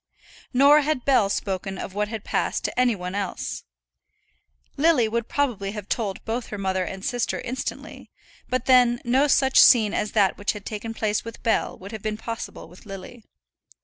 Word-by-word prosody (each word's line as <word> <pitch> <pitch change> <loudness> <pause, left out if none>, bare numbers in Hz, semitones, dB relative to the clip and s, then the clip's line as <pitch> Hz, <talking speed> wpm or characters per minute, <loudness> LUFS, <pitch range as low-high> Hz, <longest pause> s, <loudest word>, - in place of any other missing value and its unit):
Nor 280 +4 +6
had 290 -3 -1
Bell 245 -8 +4
spoken 195 -1 -3
of 190 - -6
what 210 +1 -1
had 220 -1 -6
passed - - -1
to - - -2
any 250 -3 +3
one 180 -1 -6
else. 200 -1 -4 1.1
Lily 285 -6 +3
would 235 +1 -2
probably 225 -9 -1
have 210 -2 -7
told 205 -5 -3
both 230 +2 -3
her 205 - -6
mother 190 -1 -1
and 190 +2 -6
sister 245 -3 -1
instantly; 255 +2 -6 0.4
but 255 -1 -1
then 245 -2 +5
no 260 +4 +3
such 265 -1 +5
scene 220 -5 +6
as 210 - -2
that 200 -3 +2
which 205 - 0
had 210 -2 -10
taken 225 +1 -5
place 210 -1 -1
with 230 0 -10
Bell 225 - 0
would 195 +2 -10
have 220 -2 -7
been 215 0 -3
possible 230 +1 -6
with 180 +4 -16
Lily. 195 +4 -9
220 Hz, 180 wpm, -24 LUFS, 200-250 Hz, 1.1 s, Nor